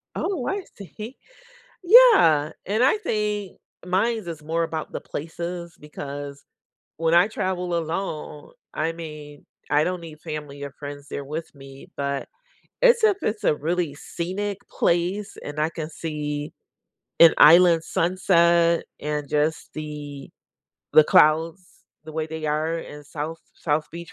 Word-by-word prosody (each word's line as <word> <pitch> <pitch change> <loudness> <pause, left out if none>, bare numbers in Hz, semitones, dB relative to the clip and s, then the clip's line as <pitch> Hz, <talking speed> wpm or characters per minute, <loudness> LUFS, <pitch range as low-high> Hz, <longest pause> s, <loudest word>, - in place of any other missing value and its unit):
Oh, 345 -11 -2
I 395 0 -2
see. 210 - -9 0.7
Yeah. 360 - +7
And 215 +5 +1
I 270 +11 +4
think 210 - -2 0.3
mines 205 +3 0
is 160 -3 -7
more 165 +2 0
about 160 -1 -4
the - - -5
places, 170 +2 -6
because 145 -1 -8 0.5
when 165 +1 +1
I 175 +4 +6
travel 180 -4 -2
alone, 160 -2 -5 0.2
I 160 +2 -1
mean, 150 -3 -10 0.3
I 150 +1 +4
don't 180 -1 -2
need 160 -2 -11
family 150 -3 -7
or 140 - -6
friends 145 0 -9
there 140 - -5
with 155 +2 -6
me. 135 0 -13
But 140 -1 -3 0.5
it's 480 -2 +6
if 410 -3 +5
it's 215 0 -2
a 150 - +4
really 165 0 -2
scenic 190 +6 -4
place 180 +5 0
and 145 +1 -7
I 155 +1 +1
can 160 -1 -6
see 150 -2 -4 0.7
an 165 -1 +8
island 165 +1 +7
sunset 170 -1 +3 0.2
and 150 -1 -3
just 150 +2 0
the 150 -2 -7 0.6
the 155 - +8
clouds 160 +5 +4 0.4
the 155 - -9
way 155 0 -2
they 160 0 -5
are 155 +2 0
in 150 -2 -9
South 155 +3 -5 0.2
South 150 -1 -1
Beach, 170 +1 -9
165 Hz, 140 wpm, -24 LUFS, 150-180 Hz, 0.7 s, an